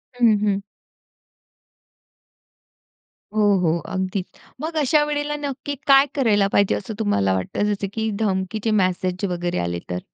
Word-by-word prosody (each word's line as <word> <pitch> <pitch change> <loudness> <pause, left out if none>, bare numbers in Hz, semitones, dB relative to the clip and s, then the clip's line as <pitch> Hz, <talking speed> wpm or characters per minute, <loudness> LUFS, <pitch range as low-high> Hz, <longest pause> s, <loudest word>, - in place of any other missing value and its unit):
हं, 230 -4 +4
हं. 200 -2 +1 2.7
हो, 215 - +1 0.2
हो. 170 -2 +2 0.2
अगदीच. 185 0 -2 0.4
मग 320 +1 -4
अशा 295 +1 +3
वेळेला 295 0 -2
नक्की 285 0 -4
काय 275 0 +7
करायला 210 -8 +3
पाहिजे 200 -1 +3
असं 215 +3 -5
तुम्हाला 100 - +1
वाटतं 205 - -1
जसं 200 0 -3
की 220 0 -1
धमकीचे 205 +1 -1
मेसेज 185 +1 -1
वगैरे 175 0 -2
आले 85 0 -2
तर? 90 0 -2
205 Hz, 130 wpm, -22 LUFS, 185-260 Hz, 2.7 s, काय